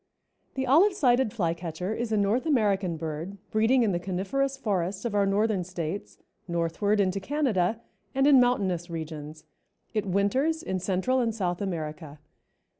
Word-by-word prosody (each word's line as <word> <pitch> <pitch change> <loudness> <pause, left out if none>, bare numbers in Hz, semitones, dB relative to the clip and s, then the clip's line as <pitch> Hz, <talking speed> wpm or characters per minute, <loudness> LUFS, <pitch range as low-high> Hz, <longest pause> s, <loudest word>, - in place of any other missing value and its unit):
_) - - -42
The 265 -1 -1
Olive 335 +11 +5
sided 255 - +3
Flycatcher 170 -1 -2
is 235 0 -3
a 215 - +2
North 210 +8 +1
American 200 - +1
bird 160 +5 -5
breeding 230 +4 +3
in 215 - +2
the 175 - 0
coniferous 200 +10 -1
forests 195 -4 -2
of 235 - -2
our 200 -1 +2
Northern 205 -1 +1
States, 175 +1 -5 0.3
northward 170 +5 0
into 195 0 +1
Canada 225 -5 0 0.4
and 270 0 +3
in 280 -2 +7
mountainous 190 -8 +1
regions. 155 -2 -7 0.5
It 215 -2 -1
winters 260 - +1
in 190 - -2
Central 190 +8 0
and 230 -3 0
South 180 -4 -2
America. 155 -5 -5
200 Hz, 155 wpm, -27 LUFS, 175-240 Hz, 0.5 s, in